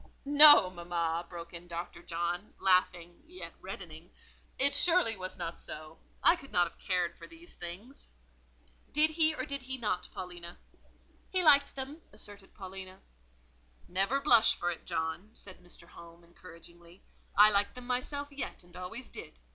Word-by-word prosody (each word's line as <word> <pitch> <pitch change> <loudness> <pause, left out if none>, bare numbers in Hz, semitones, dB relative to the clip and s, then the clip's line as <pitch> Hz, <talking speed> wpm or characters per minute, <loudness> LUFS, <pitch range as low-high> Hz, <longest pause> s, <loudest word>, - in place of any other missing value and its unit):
'" - - -35
"No, 290 -9 +9
mamma," 170 -1 -3
broke 170 -1 -9
in 170 +1 -10
Dr. 170 0 -7
John, 175 +3 -4
laughing, 180 -2 +1
yet 360 +4 -8
reddening; - - -9 0.5
"it 280 +1 +4
surely 330 -6 +4
was 185 -1 -7
not 170 -2 -5
so: 155 +1 -9 0.2
I - - +7
could 275 -6 -14
not 175 -1 +3
have - - -16
cared 180 -3 -1
for - - -12
these 335 +2 -16
things." 190 +11 -10 0.8
"Did 310 +1 +3
he 315 0 +2
or - - 0
did 280 -2 -3
he 260 +1 -5
not, 210 -7 -2
Paulina?" 175 -1 -8 0.7
"He 370 -1 0
liked 285 -3 +5
them," 275 +4 -6
asserted 200 -2 -9
Paulina. 190 -1 -9 0.9
"Never 195 +9 0
blush 240 -6 +5
for 175 - -2
it, 170 - -9
John," 160 +5 -3
said 185 -2 -11
Mr. 175 -1 -13
Home, 170 0 -14
encouragingly. 170 +1 -16 0.3
"I 210 +1 +8
like 200 +2 +1
them 250 -1 -9
myself 285 +3 -3
yet, 280 -8 -5
and 175 0 -19
always 225 +8 -6
did. - - -10
190 Hz, 160 wpm, -31 LUFS, 175-275 Hz, 0.9 s, No